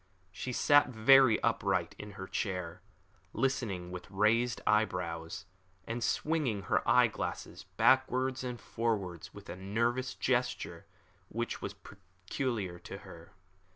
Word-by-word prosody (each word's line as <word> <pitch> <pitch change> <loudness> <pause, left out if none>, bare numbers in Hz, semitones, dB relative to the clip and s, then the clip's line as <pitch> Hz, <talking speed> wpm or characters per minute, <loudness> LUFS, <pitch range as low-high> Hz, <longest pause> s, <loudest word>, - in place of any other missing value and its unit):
She 110 +7 -5
sat 145 +2 +4
very 130 0 +6
upright 95 -6 +1
in 105 -1 -8
her 95 -1 -7
chair, 90 -4 -3 0.5
listening 105 -10 -1
with 90 +1 -8
raised 110 +5 +2
eyebrows, 90 -6 0 0.4
and 115 +1 -3
swinging 145 -11 0
her - - +1
eye - - +7
glasses - - -5
backwards 130 0 +3
and 125 -2 -4
forwards 100 -7 -3
with - - -11
a - - -6
nervous 115 +7 -1
gesture - - -1 0.4
which 120 +2 -3
was 100 - -5
peculiar 95 +1 -5
to 95 - -8
her. 85 0 -13
105 Hz, 120 wpm, -32 LUFS, 90-125 Hz, 0.5 s, eye